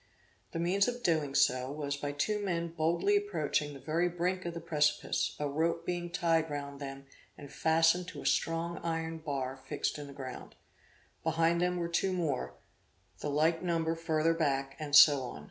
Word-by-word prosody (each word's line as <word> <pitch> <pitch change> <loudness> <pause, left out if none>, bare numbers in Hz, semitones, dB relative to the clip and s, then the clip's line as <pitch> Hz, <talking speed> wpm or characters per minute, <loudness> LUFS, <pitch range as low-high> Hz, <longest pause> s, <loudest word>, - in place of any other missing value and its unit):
The - - -4
means 180 +4 +2
of 245 0 -3
doing 155 -6 +1
so, 125 +1 +3
was 145 -1 -3
by 145 0 -3
two 210 +9 -1
men 170 -3 -1
boldly 170 +5 +1
approaching 160 -7 0
the - - -9
very 165 +5 0
brink 180 +1 -2
of 170 -1 -4
the - - -3
precipice, 150 -3 0
a 150 - 0
rope 165 +3 -1
being 175 -1 -2
tied 165 -2 +1
round 140 -1 -5
them 135 -1 -7 0.3
and 140 - -11
fastened 165 +2 +3
to - - -8
a - - -12
strong 165 +1 0
iron 165 -1 -3
bar 135 -4 -3
fixed 135 +3 -3
in 145 - -7
the 140 - -10
ground; 130 -2 -8 0.7
behind 165 +1 +2
them 180 0 +1
were 170 -1 -1
two 185 +3 0
more, 140 - -2 0.6
the 150 - -3
like 160 +3 +2
number 165 -2 0
further 165 0 +1
back 135 -4 -1
and 150 -2 -1
so 145 -2 +9
on. 125 - -6
160 Hz, 180 wpm, -31 LUFS, 145-170 Hz, 0.7 s, so